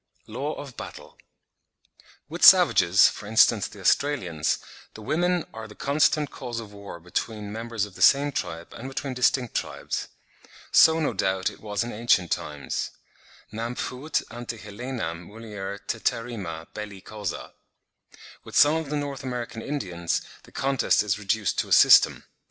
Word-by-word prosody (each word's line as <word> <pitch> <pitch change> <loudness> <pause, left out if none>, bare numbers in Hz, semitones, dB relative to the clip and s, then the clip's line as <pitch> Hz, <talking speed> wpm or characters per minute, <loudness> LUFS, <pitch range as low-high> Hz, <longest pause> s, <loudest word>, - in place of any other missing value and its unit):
LAW 145 +3 -4
OF 140 -4 -9
BATTLE. - - -10 1.1
With - - -6
savages, 90 +3 +7
for 105 - -6
instance, 110 +1 +4
the - - -13
Australians, 90 - +1 0.4
the 110 - -10
women 175 +6 0
are 110 0 -7
the 105 - -14
constant 145 +1 +1
cause 120 -3 -6
of 105 -3 -10
war 100 -4 -9
both 90 +2 -19
between 105 -3 -3
members 115 -1 -3
of 105 - -13
the - - -11
same 145 +1 +5
tribe 85 -9 -5
and 130 - -8
between 135 0 -4
distinct 125 -1 +1
tribes. - - -3 0.6
So 160 0 +6
no 150 -6 0
doubt 95 -1 0
it - - -16
was 105 0 -2
in 120 - -5
ancient 105 -6 +1
times; 70 -3 -3 0.6
"nam 115 +3 -4
fuit 130 +6 -2
ante 120 0 -6
Helenam 105 -6 -6
mulier 105 -3 -7
teterrima 100 -9 -3
belli 105 -2 -7
causa." 105 -3 -6 0.9
With - - -10
some 150 +2 +6
of 160 -3 -4
the 150 - -2
North 140 -2 -4
American 120 -3 -5
Indians, 90 - -2 0.2
the - - -19
contest 135 -3 +1
is 105 0 -1
reduced 105 -3 0
to - - -1
a - - -14
system. - - +7
115 Hz, 155 wpm, -25 LUFS, 100-135 Hz, 1.1 s, savages